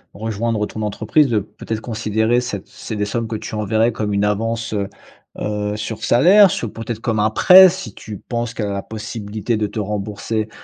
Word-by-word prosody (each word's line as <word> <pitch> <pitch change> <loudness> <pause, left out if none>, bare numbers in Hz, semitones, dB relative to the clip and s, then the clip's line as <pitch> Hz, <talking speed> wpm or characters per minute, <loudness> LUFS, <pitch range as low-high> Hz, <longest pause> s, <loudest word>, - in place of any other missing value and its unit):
rejoindre 110 0 -2
ton 110 - -7
entreprise, 110 +8 +2
de, 115 -4 +1
peut-être, 110 +2 -6
considérer 110 +1 0
cette 105 -6 -5
c'est 110 - -7
des 105 0 -1
sommes 115 +3 -2
que 110 - -4
tu 110 - -7
enverrais 110 +2 +1
comme 105 -2 -3
une 100 0 +1
avance, 115 +2 -1
heu 100 -2 -2 0.5
heu, 105 0 -2
sur 110 +1 -5
salaire, 185 - +6
sur, 115 -9 -3
peut-être, 115 0 -5
comme 115 -3 -1
un 105 +1 +3
prêt, 185 - +8
si 170 - -6
tu 105 -1 -8
penses 120 +2 -4
qu'elle 105 - -2
a 100 - -3
la 100 - -3
possibilité 110 +1 -4
de 105 -1 0
te 105 +2 -6
rembourser, 105 +1 -3
110 Hz, 195 wpm, -19 LUFS, 105-115 Hz, 0.5 s, prêt